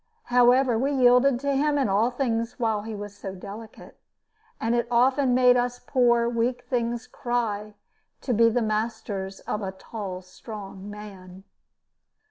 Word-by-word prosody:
However, 245 -1 +5
we 275 +3 0
yielded 250 0 +4
to 280 0 0
him 290 +1 +2
in 275 - +2
all 205 +4 +2
things 245 -2 -2
while 220 -3 0
he 220 +1 -6
was 205 0 -7
so 195 -2 -7
delicate; 210 +4 -11 0.6
and 225 +1 0
it 240 -1 +1
often 255 +2 +3
made 250 -1 +6
us 245 0 0
poor 240 -2 +2
weak 240 +1 -1
things 240 -1 -2
cry 215 -5 -3 0.5
to 250 - -1
be 230 +1 +5
the 235 +1 0
masters 215 -3 -3
of 210 - -3
a 190 -1 -3
tall 190 -2 -7
strong 195 +1 -9
man. 195 -3 -11
230 Hz, 150 wpm, -25 LUFS, 205-245 Hz, 0.6 s, made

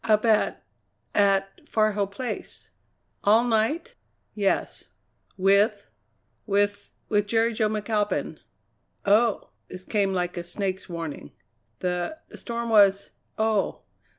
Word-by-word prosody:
"Up 215 0 +3
at 220 -2 +2 0.5
at 195 -1 +1
Far 215 -1 +2
Hill 200 -1 -1
Place." 240 +6 -6 0.5
"All 220 +3 +5
night?" 245 - 0 0.4
"Yes." 200 -2 -1 0.5
"With 200 +2 +3 0.3
" 110 +4 -46
"With 205 0 0 0.2
with 205 -1 +1
Jerry 230 +2 +2
Jo 215 -1 +1
McAlpin." 210 -1 -1 0.7
"Oh!" 215 +2 +2 0.2
This 185 0 -9
came 200 -3 +1
like 180 -1 -2
a 175 - -3
snake's 190 +1 -4
warning. 165 -4 -6 0.5
"The 180 - -2
the - - -11
storm 235 -1 -4
was 200 -2 +4 0.3
oh! 220 -2 0
205 Hz, 120 wpm, -25 LUFS, 195-220 Hz, 0.7 s, All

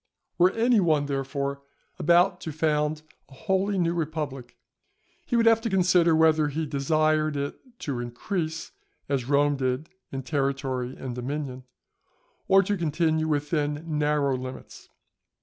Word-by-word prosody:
Were 180 +1 +6
any 230 0 +3
one, 155 -6 +2
therefore, 140 0 -3 0.4
about 175 +4 +3
to 160 - -5
found 150 0 0 0.3
a - - -15
wholly 190 +6 0
new 170 -2 +1
republic, 150 -6 -4 0.7
he 245 - 0
would 230 -1 +3
have 225 0 +5
to 230 - -2
consider 180 -3 +4
whether 160 -1 +4
he 155 +2 -2
desired 155 +1 +1
it 140 0 -4 0.2
to 135 -5 -3
increase 160 - -4 0.4
as 135 -3 -2
Rome 145 0 +3
did 130 +4 -2 0.2
in 135 0 -4
territory 135 -2 -2
and 130 -2 -5
dominion, 130 +1 -5 0.8
or 195 0 +6
to 205 +1 -1
continue 160 -1 0
within 150 0 -1
narrow 145 -2 +1
limits. 130 0 -8
150 Hz, 135 wpm, -26 LUFS, 140-165 Hz, 0.8 s, Were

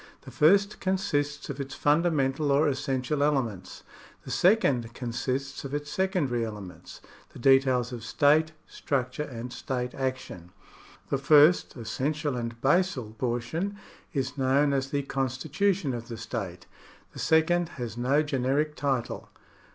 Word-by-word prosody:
The - - -12
first 200 +6 +3
consists 150 -6 -1
of 140 0 -5
its 135 0 -6
fundamental 145 -2 +2
or 145 +3 +4
essential 135 0 -1
elements; 120 -11 -1 0.4
the - - -8
second 135 - +2
consists 130 +3 -3
of 140 +1 -4
its 145 0 -4
secondary 175 - 0
elements 105 -5 -8
— - - -26
the - - -11
details 130 -1 +3
of 115 -3 -6
state 150 +6 +3
structure 130 0 -2
and 125 -4 -6
state 125 0 -3
action. 130 -10 -4 0.6
The 140 - +1
first, 150 +4 +5
essential, 140 +5 -2
and 115 -1 -4
basal 140 - +1
portion 125 +11 -2 0.4
is 140 -1 -3
known 140 +2 +3
as 135 0 -1
the 140 0 -1
con 135 -1 -1
stitution 155 +4 -1
of 120 0 -7
the 115 - -6
state. 95 -7 -5 0.5
The - - -9
second 165 +1 +2
has 120 -3 -5
no 135 +5 +2
generic 145 +1 0
title. 135 -5 -2
135 Hz, 140 wpm, -27 LUFS, 125-150 Hz, 0.6 s, first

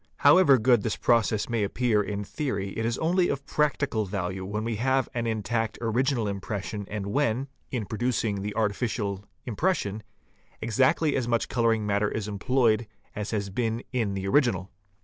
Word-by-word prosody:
However 145 -2 +6
good 120 -1 +4
this 110 - -1
process 115 -3 +2
may 115 -3 0
appear 110 +1 +1
in 105 0 -3
theory, 100 -5 -3
it 115 +3 -2
is 115 - -1
only 175 +2 +2
of 140 0 -3
practical 145 -8 0
value 95 -1 -3
when 105 +3 -3
we 115 -1 -2
have 130 +3 +1
an 115 -1 -1
intact 115 0 -1
original 120 0 +1
impression 100 +1 -4
and 105 -2 -4
when, 125 +2 +1 0.3
D 130 - -2
in 110 - -3
producing 110 -2 -1
the 105 +1 -4
artificial 105 -2 -1 0.2
impression, 115 - -1 0.6
exactly 135 +6 +2
as 130 -3 0
much 115 -1 +2
fig. - - -8
98. - - -9
colouring 115 -3 +2
matter 100 0 +1
is 110 -2 -3
employed 110 +1 +1 0.3
as 105 0 -3
has 100 -3 -2
been 115 +2 -1
in 110 -6 0
the 95 0 -3
original. 95 - +2
110 Hz, 175 wpm, -27 LUFS, 100-125 Hz, 0.6 s, However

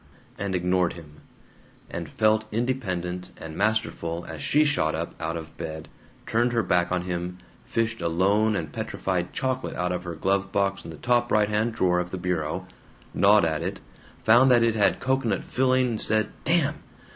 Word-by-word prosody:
and 100 -2 -2
ignored 90 0 +1
him, 75 -3 -13 0.7
and - - -5
felt 110 0 +1
independent 95 -7 -2
and 80 -1 -8
masterful 95 -5 -1
as 80 -3 -7
she 150 - +3
shot 145 - +1
up 85 +1 -4
out 80 +1 -2
of 80 -1 -9
bed, 80 0 -6 0.4
turned 120 +2 +1
her 115 -1 +2
back 90 0 +1
on 90 -1 0
him, 90 0 -4 0.3
fished 115 0 -1
a - - 0
lone 100 +6 +2
and - - -4
petrified 90 -2 -2
chocolate 130 0 -2
out 90 0 -1
of 90 0 -3
her 85 -2 -5
glove 100 +3 0
box 100 0 0
in - - -9
the 80 - -8
top 120 0 +1
right 105 -1 +3
hand 105 +2 +1
drawer 90 -5 +2
of 90 0 -3
the 95 - -4
bureau, 90 -4 -2 0.5
gnawed 100 -1 +5
at 80 0 -1
it, 95 +4 -3 0.4
found 120 +4 +6
that 120 -2 +5
it 115 -1 +3
had 105 -2 +2
cocoanut 130 -3 0
filling, 130 -3 +1
said 110 0 +1
"Damn!" 160 -3 +1
100 Hz, 180 wpm, -26 LUFS, 90-115 Hz, 0.7 s, found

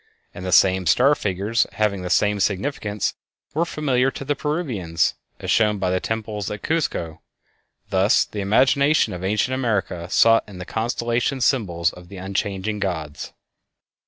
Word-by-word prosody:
And 90 - -8
the 90 - -3
same 95 0 +4
star 125 - +5
figures, 105 0 0
having 105 -3 0
the 90 - -4
same 105 +2 +2
significance, 105 0 -1 0.4
were 165 +3 +1
familiar 135 -5 +1
to 135 - -7
the 145 +1 0
Peruvians, 120 - -1 0.3
as - - -3
shown 105 -2 +3
by 95 -2 -1
the 95 - +1
temples 110 -3 -3
at 105 - -6
Cuzco. 90 - -2 0.7
Thus 95 +4 +3
the 105 - -7
imagination 135 +9 +3
of 90 0 -7
ancient 105 +6 0
America 105 -9 -1
sought 115 +3 +5
in 95 - -10
the 90 - -7
constellations 120 +4 -1
symbols 85 - +1
of 90 0 -13
the 100 - -10
unchanging 100 +2 -3
gods. 80 -7 -4
105 Hz, 155 wpm, -22 LUFS, 95-125 Hz, 0.7 s, star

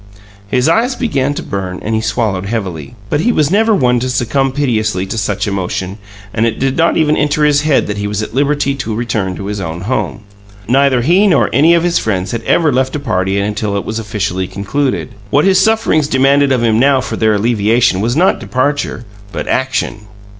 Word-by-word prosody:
His 125 +6 +1
eyes 235 +10 +2
began 145 - -1
to - - -5
burn, 95 -2 -4
and 110 - -2
he 110 - +1
swallowed 105 -3 -1
heavily; 95 - -4 0.2
but 145 - +1
he 240 - +2
was 150 -7 +1
never 220 +2 +3
one 125 -6 +2
to 130 +2 -2
succumb 130 +2 0
piteously 110 -9 -1
to 95 - -5
such 105 -1 -2
emotion, 95 0 -3 0.3
and 110 - 0
it 115 - -2
did 135 0 0
not 165 0 +2
even 155 -1 +2
enter 150 +1 +1
his 145 -1 +3
head 150 -2 +2
that 105 0 -4
he 105 - -2
was 105 +1 -2
at 110 - -7
liberty 140 +1 +1
to 120 -6 -4
return 110 -5 -2
to 100 - -7
his 105 0 -4
own 80 0 -5
home. 115 +2 -2 0.5
Neither 135 0 +3
he 180 - +4
nor 185 - +2
any 155 +7 +5
of 170 - +1
his 175 0 +1
friends 95 -3 -2
had 115 - -3
ever 160 -5 +2
left 130 +2 0
a - - -2
party 95 -7 -1
until 105 0 -1
it 100 - -4
was 110 +1 -3
officially 100 -4 -3
concluded. 130 +9 -2 0.2
What 145 - +2
his 190 -1 +4
sufferings 190 -8 +2
demanded 140 +1 +3
of 125 -3 +1
him 110 -1 +2
now 135 +1 +4
for - - -4
their 110 -1 +2
alleviation 110 -1 +2
was 120 +3 0
not 180 +5 +2
departure 130 +2 -2 0.3
but - - -5
action! 125 -5 -2
120 Hz, 210 wpm, -14 LUFS, 105-145 Hz, 0.5 s, any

